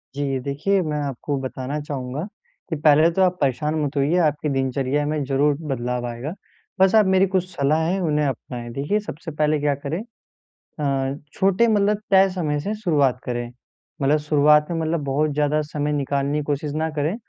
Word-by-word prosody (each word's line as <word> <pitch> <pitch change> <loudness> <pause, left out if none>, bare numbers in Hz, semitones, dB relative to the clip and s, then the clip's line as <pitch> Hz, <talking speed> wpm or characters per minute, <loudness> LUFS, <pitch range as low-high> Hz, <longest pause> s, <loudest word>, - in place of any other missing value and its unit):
जी 140 -2 -1
देखिए 170 +8 0
मैं 150 -3 -2
आपको 140 +1 -3
बताना 130 +2 -4
चाहूँगा 135 -1 -4 0.5
कि 165 - -1
पहले 155 +2 +6
तो 190 - 0
आप 180 -1 +3
परेशान 150 +3 0
मत 145 0 -3
होइए, 145 +6 +2
आपकी 150 -2 +1
दिनचर्या 135 +2 0
में 150 -1 -1
ज़रूर 140 +2 +2 0.2
बदलाव 125 0 -3
आएगा। 120 +7 -5 0.5
बस 190 +2 +5
आप 215 -2 +6
मेरी 190 0 +4
कुछ 185 -1 0
सलाह 145 0 +1
है 190 +2 0
उन्हें 150 -3 +1
अपनाएँ। 120 -2 -4
देखिए 145 - 0
सबसे 165 -5 -7
पहले 150 0 +1
क्या 145 -1 +1
करें 160 +6 -2 0.8
अ, 135 -2 0 0.2
छोटे 195 +4 +3
मतलब 210 -1 +2
तय 195 0 +6
समय 160 -6 -1
से 200 +8 -3
शुरुआत 145 - +1
करें। 120 -1 -3 0.5
मतलब 140 +3 +3
शुरुआत 150 0 +4
में 165 - -1
मतलब 160 -1 -1
बहुत 145 +2 0
ज़्यादा 150 +1 +1
समय 150 0 -3
निकालने 140 0 -1
की - - -3
कोशिश 145 +1 -2
ना 160 +1 0
करें, 155 +7 0
150 Hz, 180 wpm, -22 LUFS, 140-165 Hz, 0.8 s, पहले